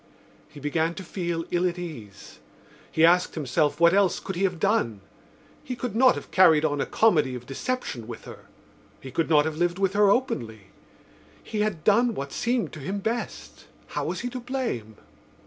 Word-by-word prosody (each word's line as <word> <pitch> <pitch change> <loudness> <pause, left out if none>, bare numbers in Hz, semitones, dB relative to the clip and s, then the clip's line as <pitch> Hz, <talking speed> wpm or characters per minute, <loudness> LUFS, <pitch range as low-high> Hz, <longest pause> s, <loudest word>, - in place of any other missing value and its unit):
He 145 - -12
began 160 +4 -1
to 190 - -7
feel 170 -2 -3
ill 180 +1 +2
at 175 - -7
ease. 120 - -9 0.5
He 160 - +4
asked 180 +2 +3
himself 150 0 0
what 170 +1 +6
else 195 -2 +3
could 190 - -6
he 190 +3 +1
have 180 -3 -2
done. 165 - +1 0.6
He 255 - -5
could 240 -3 -5
not 255 +2 +5
have - - -8
carried 160 -5 +5
on 145 -2 0
a - - -2
comedy 155 - +3
of 125 0 -8
deception 135 - -4
with 120 - -9
her; - - -11 0.5
he 130 - -10
could 165 - -1
not 150 -2 +5
have 160 -1 -3
lived 175 +1 0
with 195 -1 +1
her 205 -1 +4
openly. 115 - -1 0.7
He 215 - -4
had 200 -7 -1
done 230 +3 +3
what 140 0 -5
seemed 240 -1 -1
to 155 - -8
him 190 +9 -4
best. 225 +4 -5 0.2
How - - -3
was - - -3
he 245 - -3
to 255 - -5
blame? 240 - -4
175 Hz, 190 wpm, -26 LUFS, 145-210 Hz, 0.7 s, what